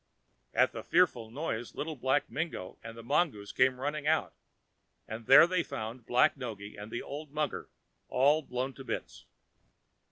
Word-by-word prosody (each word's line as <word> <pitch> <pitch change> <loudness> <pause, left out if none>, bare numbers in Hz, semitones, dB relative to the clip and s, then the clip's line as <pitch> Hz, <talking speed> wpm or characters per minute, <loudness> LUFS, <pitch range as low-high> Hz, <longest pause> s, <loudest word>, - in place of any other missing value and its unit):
At - - +4
the - - -6
fearful 160 -11 +2
noise 120 -3 -4
Little 155 +1 -3
Black 130 +2 +1
Mingo 145 - -4
and 115 0 -8
the 115 - -9
mongoose 125 -6 0
came 130 0 +3
running 150 +2 -2
out, 160 0 +2 0.7
and 110 +1 -7
there 145 +5 +10
they 180 0 +1
found 115 -4 -6
Black 125 - +4
Noggy 110 -6 -7
and 105 +2 -9
the 120 - -4
old 150 +1 -7
mugger 150 0 -2 0.4
all 145 +4 +3
blown 130 -1 -3
to 135 - -10
bits. 60 - -6
130 Hz, 160 wpm, -31 LUFS, 115-150 Hz, 0.7 s, there